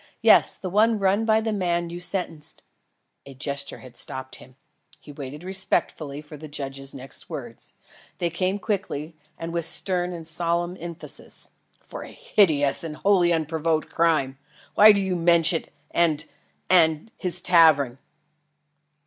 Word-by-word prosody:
Yes, - - +6
the 190 - -6
one 215 +4 +3
run 200 +2 +2
by 220 0 +3
the 220 -1 -1
man 175 -3 -1
you 175 - -6
sentenced 170 -4 -4 0.3
" - - -51
A 135 - -11
gesture 140 +2 -4
had 125 -2 -13
stopped 130 +2 -4
him. 130 0 -16 0.4
He 150 - -13
waited 145 +2 -8
respectfully 170 -6 -1
for 150 0 -11
the 155 +2 -9
judge's 135 -1 -5
next 135 0 -10
words. - - -8 0.4
They 170 -1 -1
came 185 +4 -1
quickly 180 -6 -3 0.2
and 165 0 -6
with 170 -1 -1
stern 180 0 -1
and 170 -2 -7
solemn 170 +2 -1
emphasis. 170 0 -7 0.3
"For - - -8
a - - -8
hideous 160 - +2
and 160 -2 -5
wholly 185 -1 +3
unprovoked 160 0 -1
crime. 140 -5 +1 0.3
Why 215 +1 +9
do 205 - +2
you 190 -1 -1
mention 170 -1 +3
it - - -29 0.2
and 160 -3 +2 0.4
and 160 +2 +3
his 180 -2 -4
tavern?" 155 -8 +4
165 Hz, 150 wpm, -24 LUFS, 150-185 Hz, 0.4 s, Why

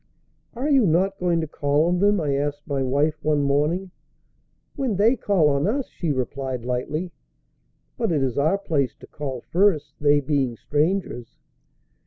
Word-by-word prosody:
"Are 255 +5 -2
you 270 -8 +4
not 190 +4 +1
going 175 -2 +1
to 160 - -3
call 145 +1 +1
on 175 +1 +1
them?" 205 +1 +3
I 145 -4 0
asked 145 +1 -2
my 140 -3 -2
wife 145 +4 0
one 150 -1 +2
morning. 150 +7 0 0.8
"When 265 -7 -1
they 220 +6 +4
call 200 -9 +2
on 140 +3 +1
us," 260 +5 -1
she 165 -4 -3
replied 130 -1 -3
lightly. 150 +8 -2 0.9
"But - - 0
it 150 -4 +1
is 130 -3 -1
our 155 +7 +2
place 150 -9 -1
to - - -14
call 135 -4 -6
first, 175 -3 +1
they 145 0 +4
being 135 -4 -1
strangers." 150 - -2
150 Hz, 165 wpm, -23 LUFS, 140-185 Hz, 0.9 s, you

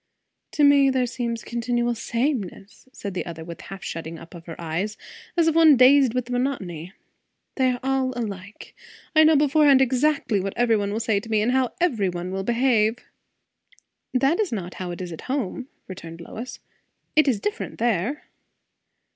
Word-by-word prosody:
"To 300 - +2
me 285 -1 +6
there 260 -1 +1
seems 235 -2 -4
continual 240 0 -1
sameness!" 230 - -3
said 200 -6 -6
the 185 - -2
other, 165 -2 -8
with 170 0 -9
a - - -13
half 195 0 -9
shutting 165 0 -6
up 165 - -13
of 170 -1 -12
her 165 - -8
eyes, 175 +6 -3 0.4
as 335 -1 +4
of 325 - +3
one 320 -4 +6
dazed 255 -1 +6
with 250 -1 -2
monotony. 190 - -3 0.6
"They 260 -2 +2
are 245 - -5
all 265 -1 0
alike. 205 -3 -7 0.4
I 315 - +7
know 315 0 +6
beforehand 290 -1 +5
exactly 265 -3 +1
what 195 +1 -4
every 235 -2 +3
one 200 -1 -1
will 215 - -2
say 220 -3 +1
to 225 - -11
me, 215 -1 +2
and 240 - +1
how 260 -1 +1
every 235 - +1
one 175 +1 -5
will 190 0 -2
behave." 235 -1 +2 1.1
"That 275 +7 +2
is 420 -4 0
not 185 -5 -4
how 180 - -4
it 175 +1 -6
is 175 - -7
at 165 - -9
home," 260 -1 -2 0.2
returned 170 -3 -9
Lois. 225 +8 -8 0.6
"It 305 -1 +5
is 240 -7 +2
different 210 +1 -4
there." 235 - 0
235 Hz, 180 wpm, -24 LUFS, 190-265 Hz, 1.1 s, I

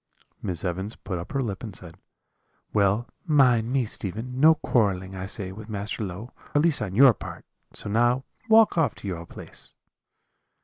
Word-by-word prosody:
"Miss 90 0 -2
Evans 95 +4 -3
put 90 -4 -5
up 85 - -8
her 135 -1 0
lip 105 -6 -3
and 110 -5 -6
said: 85 -3 -8 0.8
"'Well, 105 +3 +2 0.2
mind 125 -8 +4
me, 130 -2 +2
Stephen, 110 +5 -4
no 160 +3 +7
quarrelling, 95 -9 0
I 95 0 -5
say, 95 -1 -3
with 110 +3 -10
Master 105 +1 -3
Low, 100 +5 -6 0.2
at 145 - +4
least 165 -3 +4
on 95 -3 -3
your 130 +1 +8
part; - - -9 0.3
so - - -5
now 120 +5 +2 0.3
walk 220 -5 +6
off 145 -8 +2
to - - -8
your 85 -3 -5
place.' - - -8
110 Hz, 175 wpm, -26 LUFS, 95-125 Hz, 0.8 s, your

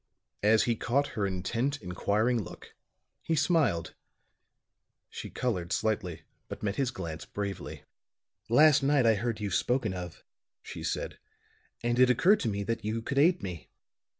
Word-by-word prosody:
As 110 +1 +4
he 120 - +1
caught 135 +6 0
her 100 -2 -1
intent, 115 +10 -2
inquiring 105 +6 0
look, 95 - -11 0.5
he 165 - 0
smiled; 145 - +1 1.2
she - - -7
colored 90 -9 -2
slightly, 95 -5 -1 0.2
but - - -8
met 100 -1 -1
his 135 -3 +1
glance 85 -9 -6
bravely. 100 -3 -5 0.7
"Last 145 +5 +6
night 135 -2 +3
I 115 - +6
heard 110 +1 -2
you 105 -2 -3
spoken 120 +2 +1
of," 90 -2 -7 0.4
she - - -8
said, - - -3 0.6
"and 120 +1 +1
it 130 0 +6
occurred 185 - +4
to 115 - -1
me 100 -1 -2
that 115 +2 -3
you 110 +2 -2
could 140 +3 -1
aid 175 +5 +4
me." 90 -4 -6
115 Hz, 150 wpm, -29 LUFS, 95-130 Hz, 1.2 s, Last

